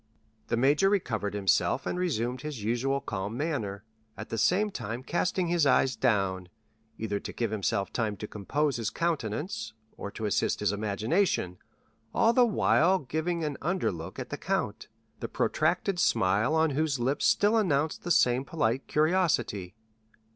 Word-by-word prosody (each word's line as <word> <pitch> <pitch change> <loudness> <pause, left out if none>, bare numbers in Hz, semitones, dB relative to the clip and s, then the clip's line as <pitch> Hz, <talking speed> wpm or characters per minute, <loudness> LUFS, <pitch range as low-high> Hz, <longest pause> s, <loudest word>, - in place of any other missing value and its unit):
The 115 - 0
major 145 +10 +4
recovered 110 - -1
himself, 100 -3 +1
and 180 - -2
resumed 125 -8 -1
his 150 -7 -6
usual 130 +5 0
calm 100 +3 -4
manner, 115 -10 -3 0.3
at - - -7
the 115 - -3
same 205 - +2
time 115 - -5
casting 180 +4 0
his 170 -4 +3
eyes 130 0 +3
down, 95 -7 0 0.5
either 105 -2 -2
to - - -7
give 115 -3 -2
himself 100 -1 -1
time 110 -4 -1
to 105 - -6
compose 140 +9 -1
his 115 -3 -1
countenance, 150 - -2 0.2
or 100 - -6
to 110 +2 -6
assist 105 - 0
his 105 -1 +1
imagination, 105 - 0 0.6
all 230 - +4
the 245 0 +5
while 190 -3 +3
giving 165 +3 -2
an 150 -2 -2
under 180 +5 0
look 85 +1 -8
at - - -6
the - - -4
count, - - -2 0.3
the - - -5
protracted 175 +4 0
smile 105 - +2
on 160 -1 +3
whose 145 -1 0
lips 130 +4 +1
still 205 +2 +3
announced 160 -8 +1
the 175 - -6
same 125 -6 +3
polite 135 -4 -1
curiosity. 150 - +1
130 Hz, 160 wpm, -28 LUFS, 105-165 Hz, 0.6 s, the